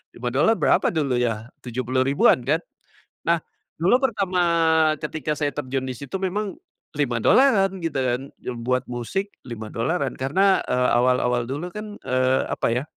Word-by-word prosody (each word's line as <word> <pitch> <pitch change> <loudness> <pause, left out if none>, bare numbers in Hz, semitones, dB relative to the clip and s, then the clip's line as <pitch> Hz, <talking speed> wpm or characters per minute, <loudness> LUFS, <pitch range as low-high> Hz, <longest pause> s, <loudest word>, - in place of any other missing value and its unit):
$5 130 - +2
berapa - - +3
dulu 140 -6 0
ya? 115 -1 -1 0.2
Rp70.000-an 130 +1 +2
kan, 155 +5 +1 0.6
nah 170 -1 +2 0.4
dulu 190 +9 +5
pertama 195 -7 0 0.6
ketika 155 0 -3
saya 145 -2 +1
terjun 135 -2 -3
di 125 - -5
situ 140 +9 -6
memang 195 +2 -2 0.4
$5-an 195 - +3
gitu 165 -4 -3
kan 125 -1 0 0.2
yang 120 -2 -5
buat 125 0 +1
musik 190 - -3 0.2
$5-an 120 +6 -2
karena, 190 +9 +3
eee, 125 0 +2
awal-awal 125 -1 +2
dulu 155 +7 -4
kan, 210 0 -7
eee, 130 +1 +2
apa - - -1
ya, 125 +3 -1
135 Hz, 140 wpm, -23 LUFS, 125-180 Hz, 0.6 s, dulu